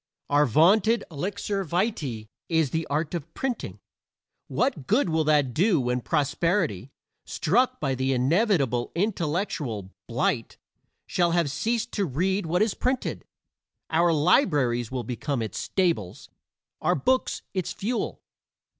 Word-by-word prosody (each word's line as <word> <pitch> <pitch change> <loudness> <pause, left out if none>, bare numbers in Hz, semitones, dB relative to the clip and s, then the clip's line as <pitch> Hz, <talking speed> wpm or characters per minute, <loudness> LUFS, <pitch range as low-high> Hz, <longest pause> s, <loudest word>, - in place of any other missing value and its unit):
Our 145 0 +4
vaunted 200 - +4
elixir 195 +5 -2
vitae 160 - -2 0.2
is 160 -5 +2
the 160 0 -2
art 150 +3 -1
of 170 -5 -5
printing. 260 -3 -3 0.7
What 215 - -1
good 220 -3 +3
will 160 0 +2
that 145 -5 +3
do 180 - +3
when 125 0 0
posterity, 150 - 0 0.3
struck 240 +11 +1
by 135 -3 0
the 130 +1 0
inevitable 135 - +1
intellectual 160 - -2 0.2
blight, - - -1 0.5
shall 175 -2 +1
have 170 -5 +1
ceased 230 - -1
to 200 - 0
read 185 +6 0
what 180 +5 +2
is 215 - 0
printed? 255 0 -2 0.7
Our 170 +1 +4
libraries 145 - +2
will 130 -2 -3
become 125 +2 -2
its 110 - -5
stables, 170 - -1 0.5
our - - +2
books 255 - 0
its 185 -3 -2
fuel. 235 +5 -3
160 Hz, 130 wpm, -26 LUFS, 135-195 Hz, 0.7 s, Our